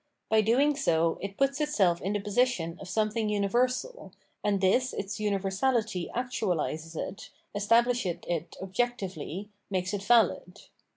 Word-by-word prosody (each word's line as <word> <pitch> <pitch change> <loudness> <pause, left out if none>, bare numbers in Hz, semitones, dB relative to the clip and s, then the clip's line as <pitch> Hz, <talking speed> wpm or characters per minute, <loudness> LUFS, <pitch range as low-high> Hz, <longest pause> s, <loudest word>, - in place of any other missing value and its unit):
By 220 0 +5
doing 265 +7 +3
so, 165 - +1
it 195 0 -6
puts 275 +2 +1
itself 195 - +2
in 195 +3 -1
the 205 - 0
position 205 -5 0
of 195 - -8
something 215 +2 0
universal, 250 - 0 0.3
and 205 -1 +1
this 245 +7 +2
its 195 +1 -4
universality 205 0 0
actualises 175 - -2
it, 190 - -5 0.2
establishes 230 -2 +2
it 170 -1 -3
objectively, 195 -3 -3 0.2
makes 185 0 -1
it 205 - -2
valid. 200 -5 +2
205 Hz, 130 wpm, -29 LUFS, 185-240 Hz, 0.3 s, By